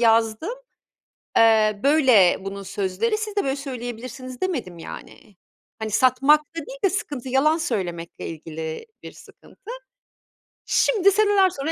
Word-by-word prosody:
yazdım, 225 - +2 0.8
eee, 215 -2 +4
böyle 260 - +5
bunun 195 +1 -7
sözleri, 195 - -1
siz 425 -1 -5
de 405 - +1
böyle 270 0 -1
söyleyebilirsiniz 255 -1 -7
demedim 245 - -3
yani. 195 +4 -11 0.4
Hani 220 -1 -4
satmakta 270 +7 +3
değil - - -9
de 390 - +4
sıkıntı 285 - -4
yalan 300 +5 +3
söylemekle 180 - -4
ilgili 160 - -7 0.2
bir - - -8
sıkıntı. 450 - -14 0.9
Şimdi 400 -5 +3
seneler 405 -2 +4
sonra 320 -2 -4
255 Hz, 125 wpm, -23 LUFS, 210-330 Hz, 0.9 s, böyle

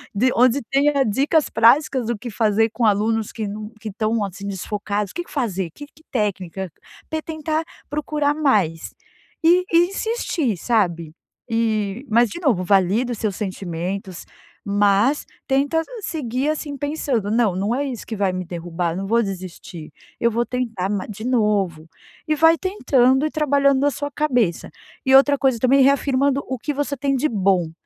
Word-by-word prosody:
de 255 +6 +3
onde 250 +3 +4
tenha 280 0 +3
dicas 280 +8 +1
práticas 250 +1 +3
do 235 -1 -1
que 240 +3 -7
fazer 220 0 +2
com 235 0 -1
alunos 215 +1 +1
que 220 - -4
não 210 +1 -6
que 220 - -5
estão 215 +1 -1
assim 195 +1 -6
desfocados. 205 +1 -3
O - - -19
que 345 - -3
que - - -17
fazer? 195 - -2
Que 290 - -9
que 310 +2 -24
técnica? 190 -5 -2 0.4
Te 315 0 -2
tentar 315 0 -3 0.2
procurar 295 -1 0
mais, 210 - 0 0.5
e 355 +3 +5
e 345 +1 +5
insistir, 390 - -1
sabe 170 -7 0 0.4
e 225 0 -1
mas 235 +1 +4
de 340 - -7
novo 250 - +1
valida 200 +6 +2
os 235 - -4
seus 205 -3 -2
sentimentos, 185 -1 -5 0.4
mas 205 +7 +2 0.2
tenta 280 +4 +1 0.2
seguir 275 - -2
assim 295 -2 -3
pensando: 275 -7 -2
"Não, 220 -5 +2
não 200 +5 -1
é 280 - -1
isso 250 -5 -5
que 225 - -4
vai 200 -2 +1
me 185 0 -4
derrubar. 170 -1 -3
Não 195 +1 -4
vou 230 +2 +3
desistir, 185 -4 -7 0.3
eu 235 - +3
vou 235 +2 0
tentar 230 -7 -2
ma 200 -2 -2
de 215 +1 -7
novo", 205 -10 0 0.4
e 310 - +2
vai 325 +2 +5
tentando 265 -8 +2
e 310 - -2
trabalhando 280 -2 +2
a 290 - +3
sua 285 +1 -4
cabeça 245 - 0 0.4
e 265 0 +5
outra 280 +1 +6
coisa 265 -3 +2
também 265 +3 +4
reafirmando 275 0 +2
o 260 -2 -4
que 295 +4 -3
você 285 0 -2
tem 275 +1 0
de 270 +4 +1
bom. 190 - +1
235 Hz, 170 wpm, -21 LUFS, 200-280 Hz, 0.5 s, outra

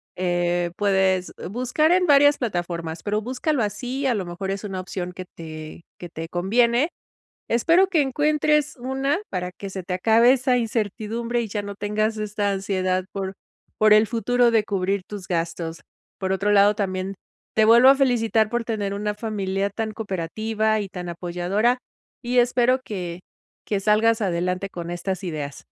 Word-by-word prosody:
eh 175 -1 0
puedes 190 -2 +1
eh, - - -6
buscar 255 - +1
en 365 0 +4
varias 290 -1 +6
plataformas, 170 -7 -3
pero 210 +3 -1
búscalo 260 +2 -1
así, 250 +6 -3
a 260 - +3
lo 205 -4 -2
mejor 175 +3 -4
es 195 +1 -4
una 195 -3 -4
opción 180 -1 -5
que 185 0 -7
te 155 0 -9 0.2
que 175 - -8
te 165 0 -6
conviene. 235 - +2 0.6
Espero 335 +11 +4
que 340 -5 +2
encuentres 300 +2 +1
una 265 +4 -1
para 180 -1 -3
que 195 +1 -8
se 190 - -5
te 180 0 -3
acabe 225 +6 +5
esa 255 -1 +2
incertidumbre 230 +1 -2
y 230 - -4
ya 205 0 -3
no 200 0 -6
tengas 215 +2 -1
esta 210 -1 -1
ansiedad 185 -1 -1
por 195 -1 -4 0.5
por 215 0 +6
el 215 +1 +6
futuro 240 +2 +2
de 225 -2 +3
cubrir 195 -1 -1
tus 205 -3 -8
gastos. 165 -1 -3 0.4
Por 190 -1 -1
otro 200 +2 +1
lado, 205 +1 +5
también 190 -1 -2 0.4
te 220 - +5
vuelvo 235 +4 +7
a 275 - +7
felicitar 225 -5 +2
por 240 0 -1
tener 205 -3 -2
una 210 +1 -2
familia 200 -2 -2
tan 220 +2 -3
cooperativa 215 +2 -1
y 200 -2 -4
tan 180 -1 -7
apoyadora, 180 +7 0 0.4
y 245 +1 -1
espero 245 +1 +3
que 180 -6 -5 0.5
que 205 - -1
salgas 220 +3 +3
adelante 180 0 -1
con 170 -2 -7
estas 185 +2 -3
ideas. 150 -5 -5
205 Hz, 170 wpm, -23 LUFS, 185-235 Hz, 0.6 s, vuelvo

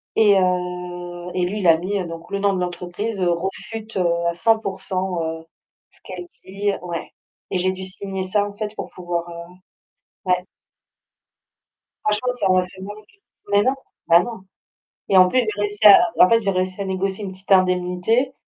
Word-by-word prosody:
Et 205 -3 +5
heu, 180 -1 -3
et 180 -1 0
lui 205 +4 -3
il 180 - +2
a 165 - +7
mis, 190 +5 -2
heu, 185 - -3
donc 165 0 -8
«le 200 - -1
nom 200 0 +2
de 185 - -1
l'entreprise» 180 +4 -4
heu, 180 -2 +2
«réfute 205 +5 -5
à 170 -1 +1
100% 190 -3 0
heu 160 0 -5 0.4
ce - - -26
qu'elle 180 -1 -7 0.2
dit». 200 +2 -1
Ouais. 170 -2 -5 0.4
Et 190 - -1
j'ai 185 +1 +2
dû 190 0 -7
signer 190 0 -5
ça 205 +2 +1
en 205 - -9
fait 210 +1 -5
pour - - -6
pouvoir, 175 -1 -4
heu 170 +1 -9 0.7
ouais. 180 -1 +1 1.6
Franchement 215 +4 +1
ça 215 -6 -1
m'a 185 0 +3
fait 185 +1 -13
mal 205 +2 -7
au 215 - -13
cul. 390 - -29 0.3
Mais 205 0 +4
non! 260 +3 +2 0.3
Bah 170 +1 +7
non. 225 -2 -6 0.7
Et 195 - +5
en 185 - +8
plus, 255 - +2
j'ai 215 -4 -1
réussi 205 0 -2
à 200 - +10 0.2
en 180 - +8
fait 230 0 +4
j'ai 200 - -1
réussi 185 +1 -2
à - - -2
négocier 190 +2 -2
une 190 - -5
petite 190 +1 -13
indemnité, 185 +7 +2
185 Hz, 190 wpm, -21 LUFS, 180-205 Hz, 1.6 s, à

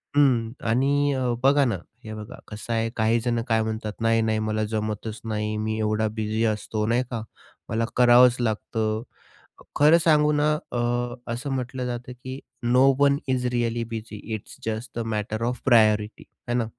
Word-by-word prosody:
हं, 125 -6 +3 0.2
आणि 140 +4 +2
अ, 130 -2 0
बघा 140 +1 +5
ना, 115 -6 0 0.3
हे 110 -1 -7
बघा 110 +2 -9
कसं 110 +2 -5
आहे, 115 0 0
काहीजण 115 +1 +1
काय 115 -1 +2
म्हणतात, 110 -1 -4
नाही-नाही, 115 -1 +2
मला 110 0 -1
जमतच 110 0 -3
नाही, 105 -1 -2
मी 110 0 -2
एवढा 110 0 +1
बिझी 110 0 -1
असतो, 105 0 -1
नाही 120 +2 +2
का, 115 -2 -3 0.5
मला 115 +1 0
करावंच 125 0 +6
लागतं. 110 -1 -1 0.7
खरं 150 +3 +6
सांगू 150 -2 +4
ना, 150 +1 +2 0.2
अ, - - -2 0.5
असं 120 +4 -4
म्हटलं 125 0 -3
जातं, 125 0 -5
की 130 +1 -6 0.2
"no 125 +2 +4
one 140 0 +4
is 130 -1 0
really 120 -1 0
busy 110 -1 -6 0.2
it's 105 - -10
just 110 +3 -3
the - - -1
matter 110 +1 -2
of 125 +1 -2
priority" 110 -3 +3 0.2
आहे 120 0 0
ना. 120 - +1
115 Hz, 165 wpm, -25 LUFS, 110-125 Hz, 0.7 s, करावंच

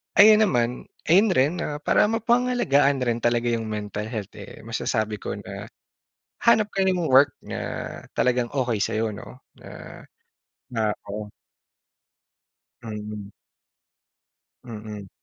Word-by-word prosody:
ayun 215 +1 +8
naman 120 -5 -1 0.2
ayun 200 +5 +6
rin, 140 +6 +3
ah, 150 -3 -3
para - - +4
mapangalagaan 225 - +2
rin 120 -1 0
talaga 120 0 +1
yung 115 -1 -2
mental 105 0 -4
health, 110 -4 -5
eh, 100 - -11
masasabi 110 -2 -2
ko - - -4
na, - - -8 0.8
hanap 215 -3 +5
ka 195 -1 +2
ng 180 -3 +1
work 135 +1 +6
na - - -6 0.5
talagang 125 -1 +1
okey 125 -6 0
sa'yo 110 -1 -1
'no, - - -11 0.2
na, - - -11 0.7
ah 105 -1 +1 0.2
oo. 105 0 -6 1.5
Mm. 105 -2 -7 1.3
Mm. 105 -4 -8
120 Hz, 120 wpm, -24 LUFS, 105-155 Hz, 1.5 s, ayun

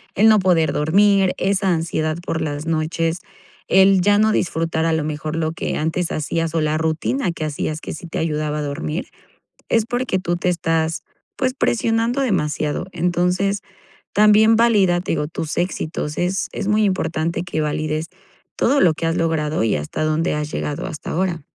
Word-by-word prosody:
el 215 +3 +5
no 215 -1 +6
poder 175 -4 +2
dormir, 195 +5 +3
esa 195 0 +1
ansiedad 160 -1 -1
por 165 - -2
las 150 -1 -3
noches, 165 +1 -1 0.5
el 190 0 +5
ya 205 +2 +4
no 215 0 +4
disfrutar, 165 -3 0
a 165 - +2
lo 160 -1 0
mejor, 155 +1 -4
lo 160 -1 0
que - - -3
antes 165 +3 -1
hacías 165 +2 -2
o 165 - +2
la 155 0 +1
rutina 160 - -1
que 160 -2 -4
hacías 155 +1 -3
que - - -6
sí 160 - -9
te 165 - -4
ayudaba 150 -1 -1
a - - -2
dormir, 150 +3 -4 0.6
es 225 -2 +2
porque 245 -5 -1
tú 175 -1 -1
te 180 - -2
estás, 165 -1 0 0.4
pues, 255 -1 0
presionando 230 0 +1
demasiado. 155 - -1
Entonces, 180 +3 0 0.5
también 215 +2 +6
valida, 205 -6 +3
te - - -4
digo, 150 -2 -1
tus 160 0 -5
éxitos, 155 -3 -2
es 180 +2 0
es 195 - -3
muy 215 +1 +3
importante 170 -3 -1
que 175 -3 -3
valides 155 +1 -1 0.5
todo 280 +4 +3
lo 170 -3 +5
que 165 - -4
has 165 - 0
logrado 155 -4 0
y 110 - +1
hasta 75 - -3
donde 155 +2 0
has 150 0 -3
llegado 145 0 -3
hasta 150 - -7
ahora. 175 -3 -1
165 Hz, 180 wpm, -20 LUFS, 155-195 Hz, 0.6 s, no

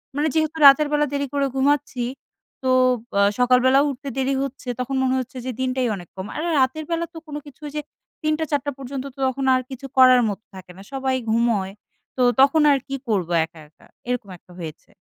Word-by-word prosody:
মানে 295 +2 +1
যেহেতু 315 0 0
রাতের 285 +2 +8
বেলা 295 0 +2
দেরি 280 0 -1
করে 280 -1 +1
ঘুমাচ্ছি, 275 -2 +1 0.6
তো 260 - +1 0.5
অ - - +5 0.2
সকালবেলা 255 +2 +4
উঠতে 280 +1 -6
দেরি 270 +1 +1
হচ্ছে। 275 -1 -7
তখন 255 +2 -2
মনে 260 0 +1
হচ্ছে 255 0 -7
যে, 260 - -2
দিনটাই 255 -1 0
অনেক 175 -3 -11
কম। 190 0 -6
আর - - -3
রা 345 - 0
রাতের 310 +4 0
বেলা 335 0 0
তো - - -10
কোন 295 - -7
কিছু 290 +1 -15
ঐযে 300 +1 -4 0.4
৩ঃ০০ 310 +1 +1
৪ঃ০০ 290 0 0
পর্যন্ত, 270 0 -6
তো - - -17
তখন 265 +1 -2
আর 255 - +1
কিছু 270 0 -8
করার 255 -1 +7
মতো 205 +1 -6
থাকে 185 -1 -11
না। - - -11
সবাই 265 -1 0 0.2
ঘুমোয়। 225 -4 +1 0.5
তো - - 0 0.2
তখন 280 +3 +5
আর 280 - +4
কি 275 - -3
করবো, 190 -6 0
একা, 165 0 -17
একা, 150 - -24 0.2
এরকম 245 -5 -2
একটা 175 +1 -22
হয়েছে। 160 -2 -9
260 Hz, 205 wpm, -22 LUFS, 245-285 Hz, 0.6 s, রাতের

